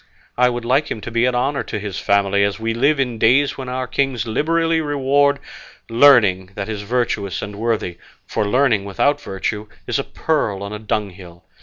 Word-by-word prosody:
I 125 0 +4
would 120 -1 -4
like 135 +5 +2
him - - -4
to 120 - -7
be 115 +1 +2
an 125 -1 +1
honour 135 +3 0
to 110 - -5
his 100 -2 -5
family, 100 0 +2
as 100 0 -1
we 115 0 -1
live 140 +5 +2
in 125 -4 -1
days 130 +6 +3
when 130 -2 -6
our 130 0 -2
kings 125 -2 -1
liberally 165 +7 +1
reward 140 -1 +2 0.5
learning 105 -8 +5
that 100 - -4
is 110 -2 -4
virtuous 105 -4 -2
and 105 0 -6
worthy; 110 -6 -2 0.3
for 105 - -2
learning 120 -3 +2
without 145 +9 +1
virtue 105 +1 -4 0.2
is - - -1
a - - -1
pearl 110 -11 -1
on 100 +1 -6
a 105 - -5
dunghill. 95 -5 -5
115 Hz, 190 wpm, -20 LUFS, 100-135 Hz, 0.5 s, learning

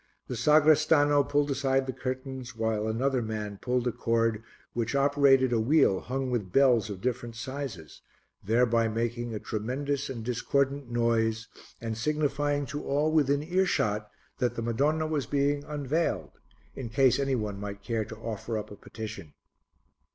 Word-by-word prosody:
The 125 - -5
sagrestano 150 +2 +4
pulled 145 +1 +1
aside 135 0 +1
the 130 - -3
curtains 130 -1 -5
while 110 -1 -1
another 130 +4 0
man 105 -2 -4
pulled 125 -1 0
a - - +2
cord 115 -1 0 0.3
which 115 +2 -2
operated 140 -2 +4
a 115 - +2
wheel 120 -5 +3
hung 130 +1 -3
with 105 -7 -2
bells 125 -4 +4
of 95 -2 -6
different 120 -1 -3
sizes, 125 - -6 0.4
thereby 115 +2 +3
making 120 +1 -2
a - - -3
tremendous 135 +7 -3
and 115 -4 -6
discordant 135 +2 0
noise 115 -1 0 0.3
and 115 -1 -4
signifying 145 +2 0
to 145 +2 -5
all 145 +3 +1
within 145 -2 +2
earshot 150 - 0 0.3
that 120 -2 0
the 115 - -3
Madonna 145 +7 +1
was 150 -5 -1
being 145 0 +1
unveiled, 150 +2 -1 0.4
in 125 -4 -6
case 130 +1 +3
any 135 -1 +1
one 105 -4 -3
might 100 0 -6
care 115 -1 -1
to 110 - -9
offer 115 0 -4
up 105 - -6
a - - -8
petition. 110 -7 -8
125 Hz, 155 wpm, -28 LUFS, 115-140 Hz, 0.4 s, sagrestano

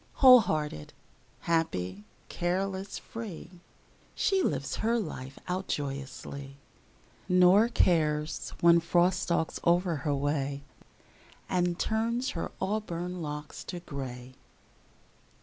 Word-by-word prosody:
Whole 255 -2 +9
hearted, 150 - -2 0.5
happy, 105 - -1 0.2
careless, 190 +2 -2
free, 180 -5 -8 0.5
She 390 -1 +2
lives - - -1
her 230 +2 +1
life 135 - -5
out 185 +1 -2
joyously, 140 0 -5 0.7
Nor 180 +4 +6
cares 155 -8 +1
when 170 0 +7
Frost 175 +2 +2
stalks 165 -2 -1
o'er 175 -1 +2
her 145 0 -1
way 140 0 -1 0.8
And 175 -1 0
turns 230 +5 0
her 165 - -4
auburn 180 -4 -3
locks 150 -1 -6
to 180 - -5
gray. 130 -5 -7
170 Hz, 100 wpm, -29 LUFS, 145-190 Hz, 0.8 s, Whole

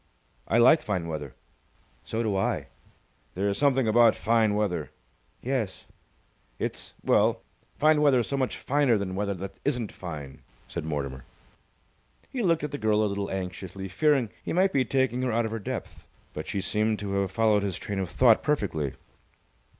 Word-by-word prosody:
"I 115 - +2
like 130 +7 +6
fine 95 -5 -2
weather." 75 -4 -5 0.7
"So 115 +1 -2
do 105 -3 0
I." 95 - -1 0.7
"There's 100 +2 0
something 135 -4 +3
about 115 +1 +5
fine 110 -2 +2
weather!" 90 -9 -1 0.5
"Yes." 125 -6 -2 0.7
"It's - - -5
it's - - -30
well, - - +3 0.3
fine 155 0 +4
weather's 130 -5 +4
so 140 - -2
much 130 -2 -1
finer 140 -4 +2
than 100 -2 -3
weather 100 +1 -1
that 95 +2 -8
isn't 125 -6 -1
fine," 75 -7 -8 0.3
said - - -5
Mortimer. 70 -4 -4 1.1
He 260 -3 -2
looked 165 -6 +2
at 150 - -3
the 145 - -4
girl 110 0 +2
a - - +3
little 100 -1 -2
anxiously, 95 0 -5
fearing 135 - +2
he - - -3
might 190 +3 +3
be 135 - +3
taking 130 -2 +1
her 130 -1 0
out 115 +1 +1
of 110 - -3
her 115 - -3
depth, 100 - -6 0.3
but - - -6
she 100 - -2
seemed 105 +3 0
to 100 -1 -5
have 95 - -1
followed 110 -1 +3
his 100 -3 -2
train 100 -1 -4
of 95 -3 -2
thought 115 +2 +5
perfectly. 95 - -1
110 Hz, 175 wpm, -27 LUFS, 95-130 Hz, 1.1 s, like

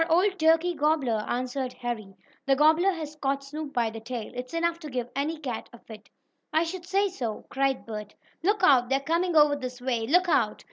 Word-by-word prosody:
"Our 325 0 +1
old 380 +3 +3
turkey 325 +2 +4
gobbler," 285 -8 +1
answered 255 +1 -2
Harry. 220 -5 -5 0.3
"The 270 - +5
gobbler 315 +6 +4
has 310 -4 -6
caught 275 -1 -1
Snoop 295 +1 -6
by 235 -4 0
the 225 - -7
tail. 230 0 -6
It's 250 0 -6
enough 335 0 0
to 310 -3 -8
give 245 -2 -4
any 300 +4 -1
cat 255 -7 -5
a 240 - -12
fit." 220 -2 -13 0.4
"I 320 - +3
should 345 +1 -6
say 395 +2 +2
so!" 240 - -5
cried 270 -1 0
Bert. 210 -2 -7 0.3
"Look 410 +4 +1
out! 255 -7 +5
They're 270 0 +2
coming 335 +4 0
over 295 -1 +6
this 255 -2 -6
way! 240 -3 -1
Look 360 +6 +4
out!" 225 -10 +2
275 Hz, 205 wpm, -27 LUFS, 245-330 Hz, 0.4 s, over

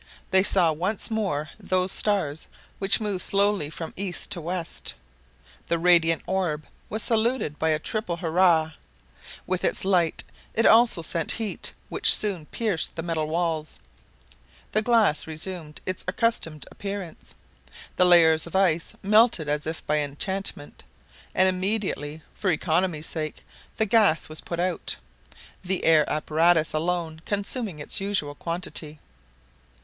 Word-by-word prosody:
They 190 - +6
saw 185 -4 +3
once 185 +8 -3
more 170 -9 -2
those 185 -2 0
stars 175 -8 0 0.3
which 195 0 +4
move 205 -4 -2
slowly 200 -6 +1
from 165 +1 -7
east 195 0 -3
to 180 -4 -3
west. 170 +1 -4 0.7
The 170 - +1
radiant 165 -1 +4
orb 175 -5 -1 0.2
was 220 0 -3
saluted 225 - 0
by 160 - +1
a 155 - +2
triple 175 +1 -2
hurrah. 165 -1 +3 0.7
With 185 0 -2
its - - +1
light 175 -4 +2 0.3
it 230 - +2
also 225 -7 +5
sent 165 0 0
heat, 225 -3 -4 0.2
which - - +5
soon 185 -8 -1
pierced 210 -8 -2
the 165 - -4
metal 160 -2 -1
walls. 160 -1 -2 0.9
The 215 - +3
glass 220 -10 +2
resumed 160 -1 -5
its 185 - -3
accustomed 185 -6 -1
appearance. 200 -4 -7 0.6
The 180 - +5
layers 165 -2 +5
of 170 - -8
ice 175 -4 +1
melted 210 -5 +4
as 150 +1 -1
if 160 0 -5
by 150 0 +1
enchantment; 145 +2 -3 0.5
and 185 - +5
immediately, 185 -6 -1
for 195 - -2
economy's 160 -1 0
sake, 155 -2 -4 0.3
the 220 - +2
gas 205 -8 +3
was 155 - -4
put 170 - -5
out, 180 +1 -1 0.7
the 185 0 -1
air 155 -2 +5
apparatus 160 +2 +2
alone 160 0 -2
consuming 205 - -2
its 145 +5 -1
usual 195 -8 -1
quantity. 165 -1 -5
175 Hz, 135 wpm, -25 LUFS, 160-195 Hz, 0.9 s, They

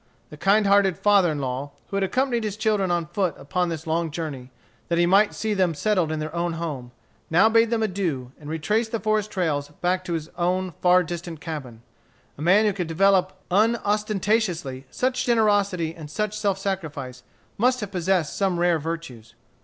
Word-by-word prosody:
The - - -8
kind 200 +6 +3
hearted 195 -3 +4
father 200 -5 +4
in 150 - -3
law, 135 +1 -4 0.2
who - - -5
had 200 - +1
accompanied 245 +3 0
his 210 -1 -3
children 215 -3 +1
on 175 -1 0
foot 175 -1 -1
upon 180 +5 -1
this 160 -2 -5
long 165 +1 0
journey, 145 -5 -6 0.4
that 170 - 0
he 175 - +4
might 200 +4 +4
see 220 -1 -1
them 185 -5 +1
settled 180 -1 +1
in 155 - -2
their 155 +1 -4
own 170 0 -1
home, 150 -7 -5 0.4
now 175 +7 +5
bade 225 0 +4
them 225 -1 0
adieu, 175 -11 -2
and 150 -1 -9
retraced 210 +9 -1
the 230 - -1
forest 215 0 0
trails 150 -7 -1
back 180 +1 +1
to 175 - -3
his 160 -2 -3
own 185 +1 0
far 180 0 +5
distant 170 -2 -6
cabin. 140 -9 -7 0.5
A - - -11
man 190 +7 +4
who 210 - +2
could 180 -3 -3
develop, 190 +2 +3 0.2
unostentatiously, 205 - 0
such 255 0 -1
generosity 205 -7 +2
and 155 -3 -10
such 210 +6 -2
self 205 -3 0
sacrifice, 150 -10 -4 0.4
must 250 +3 +3
have 205 -2 -5
possessed 180 -4 0
some 190 -3 0
rare 175 -2 +3
virtues. 145 -9 -6
180 Hz, 185 wpm, -24 LUFS, 160-205 Hz, 0.5 s, now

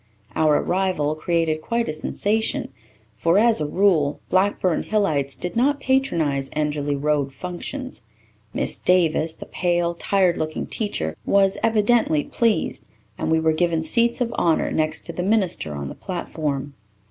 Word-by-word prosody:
Our 155 -2 +3
arrival 180 -5 0
created 160 0 0
quite 235 +5 -1
a - - -2
sensation 210 +7 -1 0.4
for, 165 - +2
as 225 -3 +4
a 150 - -1
rule, 160 -5 +2
Blackburn 185 -2 +2
Hillites 155 -11 0
did 180 -1 -5
not 280 +5 +2
patronize 165 - 0
Enderly 150 -1 -1
Road 145 -1 0
functions. 180 - -6 0.4
Miss - - +1
Davis, 165 -3 +2
the - - -9
pale, 175 -1 0
tired 185 0 +1
looking 155 0 -3
little - - -11
teacher, 80 - -2
was 195 -1 +2
evidently 220 -8 +2
pleased, 230 -2 -1 0.3
and - - -1
we 160 0 +3
were 160 0 +2
given 165 0 0
seats 235 +9 +2
of 235 -1 0
honour 165 -7 +1
next 155 0 0
to 170 - -8
the 180 - -3
minister 185 - 0
on 70 -1 -5
the - - -6
platform. 150 -6 -4
170 Hz, 150 wpm, -22 LUFS, 150-205 Hz, 0.4 s, as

